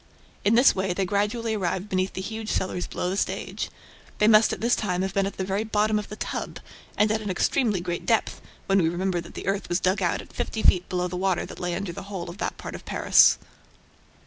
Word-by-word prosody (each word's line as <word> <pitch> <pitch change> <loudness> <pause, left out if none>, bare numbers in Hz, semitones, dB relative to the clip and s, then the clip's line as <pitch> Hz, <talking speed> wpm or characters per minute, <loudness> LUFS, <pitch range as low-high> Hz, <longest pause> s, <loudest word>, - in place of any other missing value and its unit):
In 210 +3 +4
this 245 +3 +6
way, 190 -1 -1
they 195 +1 -1
gradually 210 +4 0
arrived 190 -1 -2
beneath 185 -1 -1
the 190 - -4
huge 220 +2 -5
cellars 180 -1 -1
below 180 - -2
the - - -1
stage. - - -2 0.5
They 210 - +4
must 215 0 +6
at - - -3
this 235 +2 +2
time 185 -3 -1
have 190 0 -3
been 195 -1 +1
at 200 - -7
the 190 - -1
very 195 +3 -1
bottom 215 0 +1
of 210 - -7
the 210 - -6
"tub" - - -4 0.4
and 210 0 +3
at 220 0 0
an 205 - -4
extremely 205 +1 +1
great 175 -1 -4
depth, 225 -2 +1 0.2
when 195 0 +3
we 160 - +2
remember 175 +1 -1
that 170 - -13
the - - -6
earth 195 +1 -1
was 175 +1 +1
dug 190 +2 +1
out 175 -2 +1
at - - -11
fifty 220 - -3
feet 180 0 +4
below 180 0 0
the 180 0 -5
water 190 -1 0
that - - -10
lay 175 -1 -2
under 195 -2 -3
the - - -7
whole 175 -4 -5
of 185 - -13
that - - -3
part - - -7
of - - -8
Paris. - - +5
195 Hz, 245 wpm, -25 LUFS, 180-215 Hz, 0.5 s, this